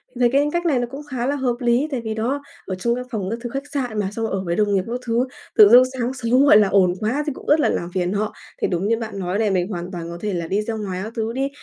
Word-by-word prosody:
mình 245 - -8
thấy 240 -1 +4
cái 285 +2 +3
cách 345 0 -1
này 280 -7 +2
nó 245 - -1
cũng 275 +2 -6
khá 245 -2 -2
là 280 +2 0
hợp 255 -3 0
lý. 245 +4 +2
Tại 260 -3 -2
vì, 220 -1 -3
đó, 245 +6 -1 0.2
ở 190 - -3
trong 235 +6 0
cái 250 - -4
phòng 200 -4 -3
các 230 - -3
thứ 240 - -4
khách 275 +3 -5
sạn 245 -6 -2
mà, 195 -2 -1
xong 225 +2 -3
rồi - - -3
ở 195 - -1
với 170 -1 -1
đồng 205 -1 +1
nghiệp 190 -1 +2
các 245 +2 -3
thứ, 235 +2 +1 0.3
tự 210 -2 +9
dưng 245 +2 +9
sáng 250 0 -2
sớm, 255 +1 +2
gọi 215 - +8
là, 210 -2 +5
ồn 185 -2 +3
quá 250 +8 0
thì 295 - -1
cũng - - -12
rất 305 +2 +5
là - - +3
làm 170 - -2
phiền 180 0 0
họ. 210 +1 -1 0.3
Thì - - +2
đúng 180 +2 -1
như 230 0 +2
bạn 220 -4 -5
nói 185 +2 -2
này, 215 -2 +2
mình 185 -1 +1
hoàn 180 -3 -5
toàn 170 -2 -6
có 170 - -6
thể 210 -2 -2
là 170 -2 -3
đi 200 +4 0
ra 225 +1 -4
ngoài 195 -4 -4
các 220 +2 -7
thứ 225 0 -2
đi, 270 +2 -1
225 Hz, 330 wpm, -21 LUFS, 195-250 Hz, 0.3 s, tự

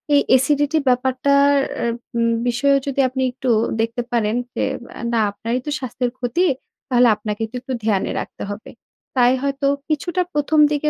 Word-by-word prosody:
এই 285 - +6 0.2
এসিডিটি 290 +3 +1
ব্যাপারটার 265 +3 +3 0.3
এ - - +1 0.3
উম 230 0 +2 0.2
বিষয়েও 275 +4 +3
যদি 275 0 -2
আপনি 260 +1 -3
একটু 255 +1 -4 0.3
দেখতে 230 +2 -1
পারেন 225 -2 +1 0.2
যে - - 0 0.3
অ্যা - - -9
না 230 - +3
আপনারই 230 +4 -3
তো 295 - -3
স্বাস্থ্যের 250 -1 -3
ক্ষতি, 255 +9 0 0.4
তাহলে 245 -1 +5
আপনাকে 210 +1 -4
তো - - -10
একটু 260 +1 -5
ধ্যানে 205 -4 +1
রাখতে - - -8
হবে। 205 +2 -8 0.5
তাই 245 0 +5
হয়তো 275 0 0 0.2
কিছুটা 340 +4 0
১ম 295 +1 +1
দিকে 300 0 +1
255 Hz, 165 wpm, -20 LUFS, 235-280 Hz, 0.5 s, এই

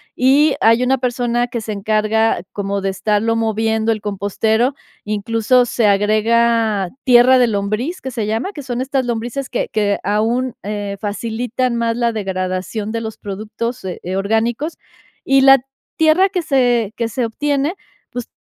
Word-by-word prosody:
y 275 +4 +4
hay 230 +2 +5
una 265 +1 +2
persona 245 -1 -1
que 235 -1 -4
se 215 -1 -5
encarga 215 0 +1
como 200 0 -2
de 195 - -3
estarlo 210 +4 0
moviendo 220 0 0
el 220 - -1
compostero, 220 +5 0 0.3
incluso 225 +4 +1
se 230 -2 +1
agrega 215 0 +2
"tierra 255 +1 +6
de 245 -1 +4
lombriz" 215 - -2
que 265 - -6
se 225 -3 -3
llama, 225 - -2
que 290 - -8
son 245 -2 -4
estas 265 0 -1
lombrices 240 +3 -3
que - - -2
que 205 -2 +1
aún, 230 +5 0
eh, 205 -1 -4
facilitan 235 +4 -2
más 230 0 0
la 235 -1 +1
degradación 190 +1 -3
de 230 - -2
los 220 -1 -6
productos, 215 +4 -5
eh, 185 -2 -5 0.2
orgánicos, 225 - -1 0.5
y 270 0 +4
la 270 0 +8 0.4
tierra 320 +5 +4
que 365 -3 -2
se 245 -7 +1
que 230 -1 -2
se 240 +2 -1
obtiene, 285 +6 -1 0.4
pues, 245 -1 -6
230 Hz, 155 wpm, -18 LUFS, 210-250 Hz, 0.5 s, la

